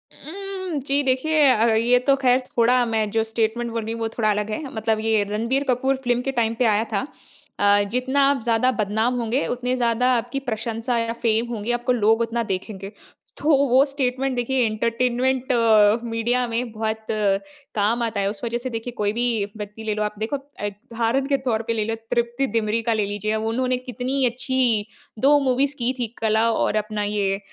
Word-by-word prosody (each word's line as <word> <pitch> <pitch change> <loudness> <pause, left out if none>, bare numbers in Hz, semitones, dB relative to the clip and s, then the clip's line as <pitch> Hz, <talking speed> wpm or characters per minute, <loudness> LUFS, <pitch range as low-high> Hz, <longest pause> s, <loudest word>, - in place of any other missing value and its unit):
उम, 375 -2 -6
जी 280 +1 +2
देखिए 295 +4 +2
अ, 225 -2 +3
ये 240 +3 +4
तो 275 - +6
ख़ैर 255 -1 +4 0.2
थोड़ा 245 +2 +4
मैं 220 -2 0
जो 225 +1 +1
स्टेटमेंट 225 +1 -1
बोल 230 -1 -3
रही 225 +1 -4
हूँ 230 - -6
वो 225 - 0
थोड़ा 215 -2 +2
अलग 210 0 0
है, 215 - -3
मतलब 220 0 0
ये 220 -1 +2
रणबीर 230 +6 0
कपूर 265 +2 +2
फिल्म 245 -1 +1
के 270 - -2
टाइम 225 0 0
पे 250 - +3
आया 215 -1 +3
था 200 +6 -1 0.5
अ, 205 0 +4
जितना 260 +3 +1
आप 280 -3 0
ज़्यादा 235 +2 +2
बदनाम 220 +5 0
होंगे, 235 +4 0
उतने 250 +1 -1
ज़्यादा 245 0 +2
आपकी 245 +4 -3
प्रशंसा 230 +2 -2
या 230 0 -1
फेम 225 0 +2
होंगें, 225 +2 -2
आपको 240 +1 0
लोग 225 -1 +3
उतना 230 0 -1
देखेंगे। 195 +1 -6 0.5
तो 300 - -1 0.2
वो 260 +2 +5
स्टेटमेंट 270 -1 -1
देखिए 245 +1 +1
एंटरटेनमेंट 245 +4 0 0.5
मीडिया 240 +2 0
में 235 +1 -2
बहुत 220 0 -3 0.7
काम 220 +3 +1
आता 225 -3 -2
है। 195 - +1
उस 205 +1 -7
वज़ह 235 0 -1
से 255 - -2
देखिए 230 +1 -5
कोई 205 0 0
भी 240 +2 0 0.3
व्यक्ति 210 +1 -7
ले 215 -1 -1
लो 210 - -1
आप, 210 0 -3
देखो 220 +6 -2
अ, 275 -6 -9
उदाहरण 230 +5 -2
के 280 -1 +2
तौर 225 -3 +1
पे 230 - +1
ले 215 -2 -1
लो 225 +1 -2 0.2
तृप्ति 240 +3 0
दिमरी 220 +1 0
का - - +4
ले 215 -2 0
लीजिए, 205 +2 -2
उन्होंने 240 +4 0
कितनी 255 +1 -2
अच्छी 245 -3 +1 0.3
2 290 +4 +5
मूवीज़ 270 +3 +1
की 245 +2 0
थी, 240 - -1
कला 220 +1 +3
और 220 - 0
अपना 215 0 -3
ये 200 -1 0
235 Hz, 195 wpm, -23 LUFS, 220-255 Hz, 0.7 s, तो